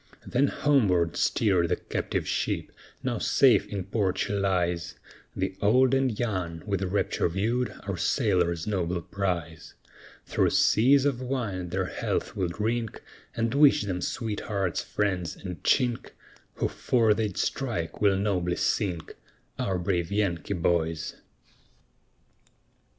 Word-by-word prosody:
Then 135 +3 +2
homeward 100 - +2
steered 95 -6 +2
the - - +2
captive - - -3
ship, - - -1 0.3
now - - -1
safe - - +4
in 100 -2 -4
port 95 -1 -1
she - - -1
lies, 90 -3 0 0.4
The 95 0 -2
old 125 +5 +4
and 130 -5 +1
young 90 -8 -2
with 100 -3 -1
rapture 95 -2 0
viewed 115 +8 0
our 100 -2 -3
sailors' 90 - +1
noble 90 -4 -1
prize; 90 -5 -4 0.5
Through - - +2
seas 135 +5 +4
of 135 -3 0
wine 115 -9 -3
their 95 +2 -1
health - - -3
we'll 95 - 0
drink, 110 +5 -2 0.3
And 115 +1 0
wish 140 -5 +5
them 90 -3 -3
sweet 110 +1 -3
hearts, 95 -5 -2
friends, 90 -5 -2
and 90 -3 -8
chink, 125 -3 +1 0.5
Who - - 0
'fore 115 -4 +2
they'd 105 -3 -2
strike, 115 -12 -2
will 100 -2 +4
nobly 90 -3 0
sink 90 -7 -1 0.4
Our 95 -2 0
brave 85 -1 -1
Yankee 100 -2 -1
boys. 80 -2 0
100 Hz, 130 wpm, -27 LUFS, 90-115 Hz, 0.5 s, wish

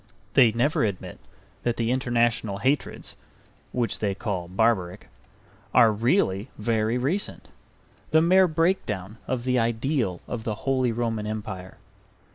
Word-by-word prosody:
They 125 -5 +6
never 120 +7 +1
admit 100 -4 -3 0.4
that 120 -1 -1
the 115 0 0
international 120 -5 +1
hatreds 135 +7 -1 0.6
(which 120 -2 -1
they 100 -2 -1
call 95 -5 -3
barbaric) 95 -1 0 0.7
are 115 -3 +7
really 110 - +1
very 110 +1 0
recent, 155 +11 -2 0.6
the 160 - +5
mere 185 +3 +5
breakdown 115 - -1
of 125 -2 -2
the 125 0 +2
ideal 115 - 0
of 115 -3 -4
the 110 -2 -2
Holy 130 -3 +2
Roman 115 -2 -2
Empire. 95 -4 -6
115 Hz, 125 wpm, -25 LUFS, 105-130 Hz, 0.7 s, are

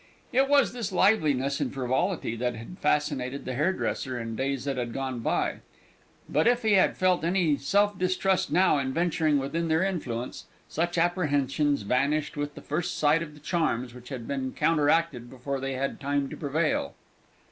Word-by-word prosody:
It 270 +2 +3
was 285 -4 +4
this 235 -6 -4
liveliness 150 -9 +2
and - - -1
frivolity 135 - -1
that 125 0 -1
had 115 - -10
fascinated 140 -3 0
the 130 - -3
hairdresser 140 -4 -1
in 115 -1 -5
days 135 +1 -2
that 140 -1 -1
had 120 -2 -3
gone 130 -2 -3
by; 115 - 0 0.7
but 155 +7 +2
if 245 0 +3
he 220 -1 +3
had 190 - +4
felt 185 -3 +2
any 170 -3 +2
self 205 +9 +2
distrust 185 +1 +1
now 180 -5 +4
in 130 -1 -2
venturing 165 -2 +2
within 160 +5 -2
their 160 +2 +2
influence, 130 -11 -3 0.2
such 170 +2 -2
apprehensions 145 - +1
vanished 140 +8 0
with 145 0 -4
the - - -9
first 175 +4 -2
sight 155 +2 +3
of 150 -3 -7
the - - -14
charms 150 -6 -1
which 125 0 -12
had 125 -5 -6
been 135 -2 -3
counteracted 150 -5 +1
before 135 +2 -4
they 135 0 -3
had 135 +1 -3
time 140 0 -1
to - - -7
prevail. 155 +1 -1
145 Hz, 175 wpm, -27 LUFS, 130-175 Hz, 0.7 s, was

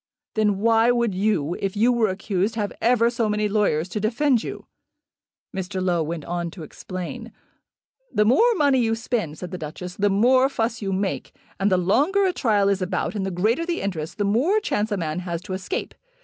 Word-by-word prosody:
"Then 210 -2 +2
why 225 +2 +3
would 235 -4 +2
you, 185 -5 0
if 195 +1 -3
you 235 +4 +4
were 235 -2 +2
accused, 195 +3 -1
have 210 -2 -2
ever 235 0 +3
so 235 -2 0
many 210 0 +1
lawyers 200 -6 +1
to 210 - -3
defend 235 +4 +2
you?" - - -7 0.9
Mr. 190 0 -3
Low 180 -2 +1
went 160 -1 -4
on 175 0 -3
to 165 0 -10
explain. 180 +3 -7 0.8
"The 210 - +2
more 450 - +4
money 285 -6 +3
you 225 -2 +1
spend," 225 -9 -3
said 180 +1 -7
the 180 - -5
Duchess, 175 +3 -7
"the 205 0 +2
more 255 +7 +4
fuss 230 -3 -2
you 195 -1 -2
make. 195 0 -2 0.3
And 200 +1 +2
the 185 - +4
longer 290 - +2
a 370 - +1
trial 210 - +2
is 200 -1 +1
about 185 0 -1
and 195 -3 -2
the - - -1
greater 215 - +1
the 345 0 -2
interest, 165 -6 -4
the 205 - 0
more 255 - +2
chance 215 - -1
a 205 - 0
man 160 -1 -2
has 175 -2 -4
to 190 - -6
escape. 285 - -4
205 Hz, 205 wpm, -23 LUFS, 185-235 Hz, 0.9 s, you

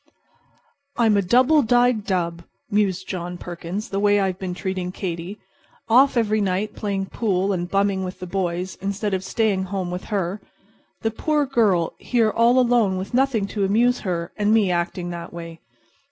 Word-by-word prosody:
"I'm 225 -3 +4
a 200 - +3
double 255 - +4
dyed 245 -2 +2
dub," 170 -3 -1 0.3
mused 195 -3 +1
John 180 -1 -4
Perkins, 175 +5 -6
"the 195 - -2
way 205 0 +3
I've 190 -2 -1
been 185 -2 -4
treating 185 -1 -3
Katy. 180 +1 -5 0.5
Off 260 +3 +5
every 215 -2 +2
night 200 +2 -1
playing 200 -2 -2
pool 195 -1 0
and 175 -1 -3
bumming 195 -1 +1
with 185 0 -6
the 185 - -6
boys 180 0 -3
instead 200 +1 -2
of 190 0 -1
staying 195 -2 0
home 185 -2 -3
with 180 +1 -5
her. 195 -1 -2 0.6
The 225 - 0
poor 300 +6 0
girl 210 -10 +2
here 230 -3 +1
all 235 +3 +3
alone 235 -6 +3
with 190 +4 -6
nothing 255 -5 +2
to 205 - -2
amuse 235 +6 +3
her, 170 -4 -3
and 210 0 +2
me 215 -4 +3
acting 175 0 -2
that 170 -1 -7
way! 165 -1 -8
195 Hz, 170 wpm, -22 LUFS, 180-220 Hz, 0.6 s, Off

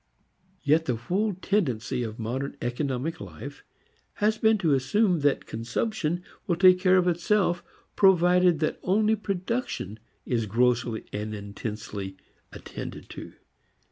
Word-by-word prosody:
Yet 155 +2 +3
the 125 - 0
whole 190 - -1
tendency 130 - 0
of 110 -2 -4
modern 130 +5 -3
economic 130 +4 -2
life 85 -6 -9 0.5
has 215 +1 +1
been 220 0 +4
to 165 -7 +2
assume 175 - +2
that 145 -1 +1
consumption 165 - -2 0.2
will 175 - +2
take 180 +1 +6
care 185 0 +4
of 180 -1 +3
itself 175 0 +1 0.3
provided 180 -3 +4 0.2
only 215 +3 +2
production 195 - -3 0.3
is 115 -3 -1
grossly 120 0 +1
and 105 +1 -3
intensely 100 -1 -6 0.3
attended - - -8
to. - - -9
155 Hz, 120 wpm, -27 LUFS, 115-185 Hz, 0.5 s, take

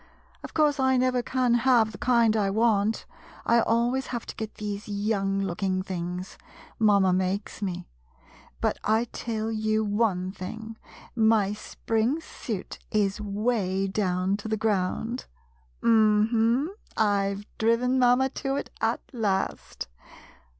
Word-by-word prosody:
Of - - -10
course, 300 -2 +3
I 260 0 +3
never 255 0 +2
can 250 0 +1
have 240 -2 +4
the 195 - -11
kind 235 -3 +3
I 205 -3 +2
want; 215 0 +2 0.4
I 235 - +4
always 240 +4 +1
have 240 -2 -4
to - - -8
get 220 -1 -6
these 205 0 -5
young 200 -1 0
looking 185 0 -1
things 180 0 -5 0.2
— - - -22
mamma 200 -4 +4
makes 190 +3 -2
me 180 -3 -3 0.3
— 60 - -26
but - - 0
I 220 +2 +3
tell 225 -1 -3
you 215 0 +1
one 205 -3 0
thing 220 +4 -7 0.3
— - - -22 0.2
my 205 -2 +1
spring 225 +6 -1
suit 220 - -6
is 205 0 0
'way 205 -2 0
down 190 -1 0
to 205 - -7
the 220 0 0
ground. 215 +3 -1 0.6
Um 215 -1 +4
hum, 240 - +2 0.2
I 200 -2 +2
've 205 +1 -9
driven 240 +3 +2
mamma 250 +1 +4
to 270 0 -3
it - - -4
at - - +1
last. 205 -5 -2
215 Hz, 145 wpm, -27 LUFS, 195-235 Hz, 0.6 s, have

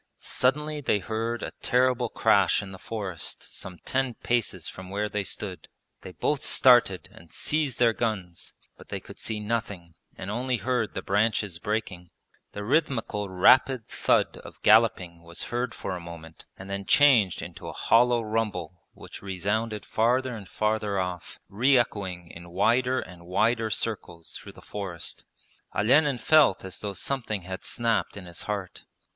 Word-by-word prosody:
Suddenly 150 +3 0
they 120 - +2
heard 115 +3 -3
a - - -4
terrible 125 -1 +2
crash - - +3
in 95 - -9
the 95 - -10
forest 100 -7 -5
some 90 -2 -8
ten 130 -2 0
paces 100 -8 -1
from 95 0 -9
where 105 +2 -1
they 105 -1 -2
stood. 95 -1 -5 0.3
They 95 - -9
both 145 - -1
started 120 -8 +5
and 85 -1 -16
seized 150 -5 0
their 120 -2 +4
guns, 95 -7 -3 0.3
but - - -15
they - - -3
could - - -13
see 110 -1 -3
nothing 105 -6 -3 0.2
and 95 - -5
only 125 +3 -1
heard 120 0 -1
the - - -3
branches 105 -3 +1
breaking. 95 -4 -3 0.4
The 105 - -5
rhythmical 115 -6 0
rapid 120 +6 +4
thud - - +1
of - - -12
galloping 105 -6 +4
was 85 0 -7
heard 120 0 -1
for 95 - -4
a - - -5
moment 85 -2 -11
and 95 - -9
then 100 0 -4
changed 120 - +5
into 85 0 -9
a - - -4
hollow 120 0 +3
rumble 100 -6 -2
which - - -11
resounded 105 +3 -2
farther 125 +3 +1
and 100 -4 -9
farther 105 0 0
off, 90 -3 -4
re 130 +7 +3
echoing 95 -7 -2
in 85 +1 -11
wider 120 +8 +2
and 85 -1 -10
wider 110 +4 +2
circles 90 -7 -3
through - - -9
the - - -15
forest. 95 -5 -6 0.5
Olenin 135 +5 +4
felt 145 -8 +4
as 95 - -6
though 105 -1 -4
something 110 -3 -3
had 95 +1 -6
snapped 115 -3 0
in 95 - -8
his 85 -1 -7
heart. 100 -3 -4
105 Hz, 160 wpm, -27 LUFS, 95-120 Hz, 0.5 s, started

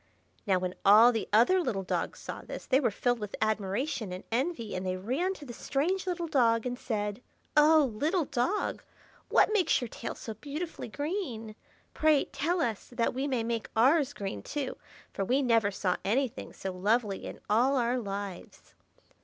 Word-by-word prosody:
Now, 190 -2 +4
when 180 0 -2
all 215 +5 +8
the 225 -3 -3
other 245 - +5
little 195 - -2
dogs - - -2
saw - - -7
this, - - -8
they 265 0 +3
were 265 - +2
filled 245 +3 0
with 210 -2 -5
admiration 215 +2 -1
and 180 +1 -6
envy, 245 -2 -1
and 185 - -3
they 185 0 -2
ran 275 - -1
to 300 - -11
the 240 - -8
strange 345 - -1
little 350 -1 -1
dog 235 -6 +3
and 250 0 -2
said,— 210 -1 -3 0.3
"Oh, 300 -3 +6
little 315 - 0
dog! 310 +12 -1 0.5
what 430 - +4
makes 370 -7 +3
your 245 - -4
tail 230 - -6
so 220 - -7
beautifully 300 +7 -6
green? 265 - -4 0.4
Pray 310 -2 +3
tell 335 +5 -1
us, 225 -7 -2
that 235 -1 0
we 265 +3 -1
may 255 -5 0
make 230 -1 -3
ours 280 +4 +4
green 195 - -5
too, 285 - -4 0.4
for 195 - -2
we 260 +8 +2
never 230 -4 +3
saw 190 -2 -1
anything 255 +4 -1
so 190 - -5
lovely 205 +2 0
in - - -8
all 245 +6 +3
our 245 +1 +1
lives." 200 -3 -7
240 Hz, 180 wpm, -30 LUFS, 210-290 Hz, 0.5 s, all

